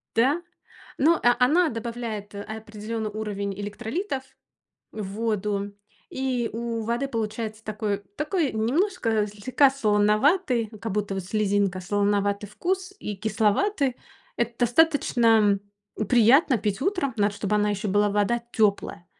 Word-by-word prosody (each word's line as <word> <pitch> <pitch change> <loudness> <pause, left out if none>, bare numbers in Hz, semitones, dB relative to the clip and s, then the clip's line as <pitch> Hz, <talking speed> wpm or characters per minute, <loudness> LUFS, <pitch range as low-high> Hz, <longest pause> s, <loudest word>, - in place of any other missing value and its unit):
Да? 275 +9 +3 0.6
Но, 320 +4 +4
а, 240 0 +4
она 330 +5 +3
добавляет 230 -3 -5
определённый 220 +1 -5
уровень 205 -2 -4
электролитов 260 - -4 0.7
в 215 - -5
воду, 205 -1 -2 0.3
и 255 -3 -1
у 230 0 -3
воды 235 +5 -1
получается 220 -2 -4
такой 210 -2 -2 0.2
такой 300 -1 0
немножко 230 - +1
слегка 245 +7 +2
солоноватый, 235 - +2
как 225 -2 -4
будто 205 -1 -1
вот 190 -2 -4
слезинка, 200 -2 0
солоноватый 205 +1 0
вкус 370 - -2
и 210 - -5
кисловатый. 230 - +1 0.4
Это 235 0 -2
достаточно 235 -6 +4 0.5
приятно 250 +4 +5
пить 205 -1 -2
утром, 355 -4 0
надо 205 -1 +1
чтобы 205 0 -2
она 210 0 +2
ещё 205 0 -2
была 205 +2 +3
вода 210 +4 +1
тёплая, 200 -5 0
220 Hz, 120 wpm, -25 LUFS, 205-255 Hz, 0.7 s, приятно